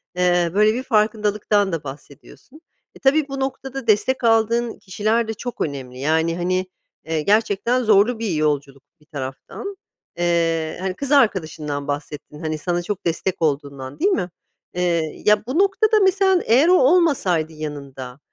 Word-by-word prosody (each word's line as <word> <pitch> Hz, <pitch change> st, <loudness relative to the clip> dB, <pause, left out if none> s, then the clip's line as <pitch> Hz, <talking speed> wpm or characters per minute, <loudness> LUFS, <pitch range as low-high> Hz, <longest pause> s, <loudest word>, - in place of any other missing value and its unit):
eee, 175 Hz, -1 st, +2 dB
böyle, 215 Hz, +2 st, +4 dB
bir 255 Hz, +2 st, -3 dB
farkındalıktan 210 Hz, -3 st, +1 dB
da 160 Hz, -2 st, -3 dB
bahsediyorsun. 145 Hz, -, -12 dB, 0.3 s
E, -, -, -14 dB
tabii 285 Hz, +2 st, +2 dB
bu 275 Hz, -1 st, -5 dB
noktada 270 Hz, -1 st, -4 dB
destek 215 Hz, +5 st, +2 dB
aldığın 230 Hz, +1 st, +2 dB
kişiler 215 Hz, +4 st, -1 dB
de 220 Hz, -, -3 dB
çok 245 Hz, +3 st, -7 dB
önemli. 130 Hz, -4 st, -4 dB
Yani, 160 Hz, +3 st, +1 dB
hani, 185 Hz, +1 st, 0 dB, 0.4 s
eee, 160 Hz, -1 st, -1 dB
gerçekten 220 Hz, +5 st, +1 dB
zorlu 220 Hz, +2 st, +3 dB
bir 220 Hz, -5 st, -2 dB
yolculuk 145 Hz, -3 st, -1 dB, 0.2 s
bir 150 Hz, -, -24 dB
taraftan. 145 Hz, -, -7 dB, 0.4 s
Eee, 165 Hz, -2 st, 0 dB
hani, 190 Hz, -1 st, -2 dB
kız 280 Hz, +6 st, -4 dB
arkadaşından 160 Hz, -, +1 dB
bahsettin, 145 Hz, +1 st, -6 dB
hani, 155 Hz, -1 st, -3 dB
sana 175 Hz, +2 st, -2 dB
çok 195 Hz, +1 st, -5 dB
destek 170 Hz, +2 st, -2 dB
olduğundan, 140 Hz, -3 st, -2 dB
değil 395 Hz, +5 st, +2 dB
mi? 180 Hz, -, -1 dB, 0.4 s
Eee, 170 Hz, -3 st, -1 dB
ya 210 Hz, 0 st, +4 dB
bu 270 Hz, +8 st, -1 dB
noktada 425 Hz, +2 st, +3 dB
mesela 380 Hz, -1 st, +3 dB
eğer 260 Hz, +9 st, +4 dB
o 365 Hz, -, +5 dB
olmasaydı 255 Hz, -, +2 dB
yanında, 140 Hz, -4 st, -7 dB
190 Hz, 150 wpm, -21 LUFS, 155-240 Hz, 0.4 s, o